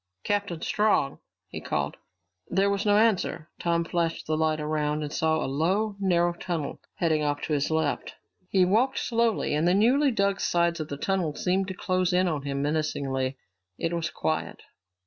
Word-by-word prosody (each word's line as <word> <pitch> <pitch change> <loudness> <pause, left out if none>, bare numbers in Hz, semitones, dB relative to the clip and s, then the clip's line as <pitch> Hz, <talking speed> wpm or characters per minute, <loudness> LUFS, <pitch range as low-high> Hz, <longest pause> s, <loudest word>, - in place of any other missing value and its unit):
"Captain 200 -5 -1
Strong?" 210 -10 +1 0.3
he - - -7
called. - - -2 0.5
There 195 +2 +2
was 200 +1 -1
no 205 0 +5
answer. 205 -7 +1
Tom 170 -1 +1
flashed 165 -1 -1
the 155 - 0
light 155 0 +1
around 150 0 -1
and 150 - -5
saw 160 0 +2
a 160 - -1
low, 185 +10 0
narrow 175 -3 +2
tunnel 170 -4 -4 0.2
leading 160 -3 +2
off 145 -1 -1
to 155 - -1
his 145 -1 +1
left. 160 -2 -1 0.3
He 185 -2 +4
walked 235 +8 +2
slowly, 230 -6 +1
and 155 +3 +2
the 180 - +4
newly 260 +8 +4
dug 200 -5 +1
sides 170 -1 +1
of 155 - -3
the 140 - -5
tunnel 175 -2 -1
seemed 190 +1 0
to 190 - -5
close 185 0 0
in 180 +1 +3
on 155 -4 -1
him 140 0 -2
menacingly. 140 -3 -1 0.4
It 165 - -2
was 170 -1 -1
quiet. 155 - -3
170 Hz, 180 wpm, -27 LUFS, 155-195 Hz, 0.5 s, no